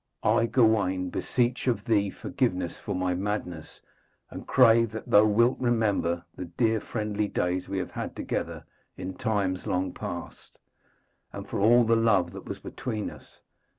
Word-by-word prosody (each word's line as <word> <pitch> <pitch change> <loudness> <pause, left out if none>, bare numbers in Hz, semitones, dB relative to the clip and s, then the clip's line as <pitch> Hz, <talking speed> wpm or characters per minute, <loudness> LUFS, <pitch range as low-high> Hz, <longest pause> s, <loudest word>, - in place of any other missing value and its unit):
I, 115 +2 +3
Gawaine, 100 -7 +2
beseech 125 +1 -1
of 115 -5 0
thee 100 -3 +2
forgiveness 95 -8 -2
for - - -4
my 90 0 0
madness, 90 -4 -4 0.5
and - - -9
crave 115 -2 +5
that 110 - -6
thou 105 +1 +6
wilt 115 +4 +3
remember 105 -8 0
the 90 - -6
dear 110 +5 0
friendly 105 -1 -2
days 90 -1 -2
we 100 - -2
have 95 - -3
had - - -5
together - - -4 0.3
in 95 +1 -5
times 100 -3 -1
long 90 0 -1
past, - - -8 0.7
and - - -8
for - - -3
all 120 +4 +5
the 115 0 +3
love 100 -6 +2
that 95 0 -10
was - - -5
between 110 -4 -5
us. - - -16
105 Hz, 155 wpm, -27 LUFS, 95-115 Hz, 0.7 s, thou